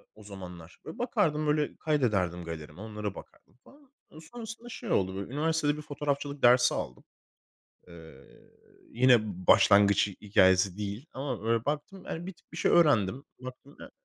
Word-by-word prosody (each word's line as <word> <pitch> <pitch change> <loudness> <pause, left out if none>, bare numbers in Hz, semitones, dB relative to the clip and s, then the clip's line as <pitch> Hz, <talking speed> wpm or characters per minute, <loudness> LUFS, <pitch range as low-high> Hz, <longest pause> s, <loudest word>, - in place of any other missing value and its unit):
o 110 - -15
zamanlar. 90 -4 -11
Böyle, 160 - -8
bakardım 195 -11 0
böyle 150 0 0
kaydederdim 105 - 0
galerime 80 +1 -8
onlara 105 -2 -5
bakardım - - -15
falan. 280 -2 -21 0.3
Sonrasında 230 +6 -9
şey 225 - -7
oldu, 95 0 +1
böyle, 100 +6 -6
üniversitede 150 0 0
bir - - -6
fotoğrafçılık 145 -1 -4
dersi 125 +1 +6
aldım. - - -6 0.9
Eee, 80 -5 -14 0.7
yine 125 +1 +5 0.3
başlangıç 100 0 +5
hikâyesi 95 -2 +2
değil 105 +6 -5
ama 135 -4 -4
böyle 115 0 0
baktım, 150 +6 -4
yani 170 +2 -5
bir 190 - -6
tık 175 - -31
bir - - -9
şey - - +2
öğrendim. 135 - +3 0.2
Baktım 130 +2 -11
e - - -11
125 Hz, 150 wpm, -29 LUFS, 100-150 Hz, 0.9 s, dersi